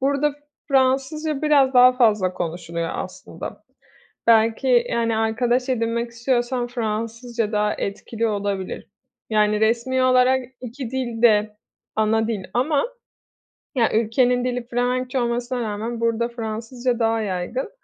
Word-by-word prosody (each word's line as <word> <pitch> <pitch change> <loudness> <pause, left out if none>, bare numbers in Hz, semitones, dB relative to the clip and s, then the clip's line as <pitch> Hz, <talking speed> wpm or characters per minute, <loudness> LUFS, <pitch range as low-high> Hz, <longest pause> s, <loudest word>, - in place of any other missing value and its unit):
burada 280 +2 +1 0.4
Fransızca 275 +3 +1
biraz 280 -3 +4
daha 250 0 +8
fazla 215 -7 +2
konuşuluyor 170 -1 -4
aslında. - - -7 0.6
Belki, 230 +2 +4
yani, 230 -1 0
arkadaş 240 +3 +1
edinmek 235 -1 -1
istiyorsam 240 +1 -1
Fransızca 230 -1 -3
daha 210 -1 +1
etkili 225 +3 -3
olabilir. 200 -3 -3 0.4
Yani, 210 -1 +2
resmi 235 +4 +1
olarak 255 0 +4 0.2
2 250 0 -6
dil 240 -4 -3
de 210 -2 +3 0.4
ana 220 +1 +2
dil 215 -5 -3
ama 280 +4 +2 0.9
ya, 235 -4 +2
ülkenin 245 +3 +2
dili 250 -1 -2
Felemenkçe 250 +2 -1
olmasına 240 +1 -1
rağmen 225 +1 -3
burada 230 0 +1
Fransızca 235 +2 -3
daha 225 -1 +1
yaygın. 205 - -3
235 Hz, 120 wpm, -22 LUFS, 220-255 Hz, 0.9 s, daha